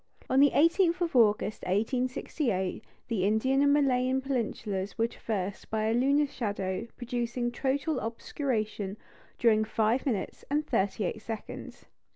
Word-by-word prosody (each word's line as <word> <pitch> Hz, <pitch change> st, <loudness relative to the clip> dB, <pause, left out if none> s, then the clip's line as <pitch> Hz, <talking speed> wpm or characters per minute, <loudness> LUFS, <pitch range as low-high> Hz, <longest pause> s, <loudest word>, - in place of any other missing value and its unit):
On 260 Hz, -, +4 dB
the 285 Hz, +1 st, +7 dB
18th 335 Hz, +4 st, +3 dB
of 335 Hz, -5 st, -1 dB
August, 215 Hz, -3 st, +3 dB
1868, 225 Hz, -, -1 dB, 0.2 s
the 220 Hz, -6 st, -1 dB
Indian 220 Hz, +7 st, +2 dB
and 285 Hz, 0 st, +5 dB
Malayan 260 Hz, -2 st, +3 dB
peninsulas 215 Hz, -7 st, -3 dB
were 225 Hz, -, +3 dB
traversed 205 Hz, -4 st, -4 dB
by 220 Hz, 0 st, -1 dB
a 220 Hz, +1 st, +2 dB
lunar 280 Hz, +5 st, +3 dB
shadow 205 Hz, -5 st, -3 dB
producing 240 Hz, 0 st, -2 dB
total 275 Hz, +3 st, -1 dB
obscuration 220 Hz, -4 st, -3 dB, 0.4 s
during 220 Hz, -2 st, +4 dB
five 220 Hz, +4 st, +1 dB
minutes 215 Hz, -7 st, -2 dB
and 300 Hz, +2 st, +1 dB
thirty 200 Hz, +2 st, 0 dB
eight 210 Hz, +4 st, -3 dB
seconds. 220 Hz, 0 st, -7 dB
235 Hz, 135 wpm, -29 LUFS, 215-270 Hz, 0.4 s, the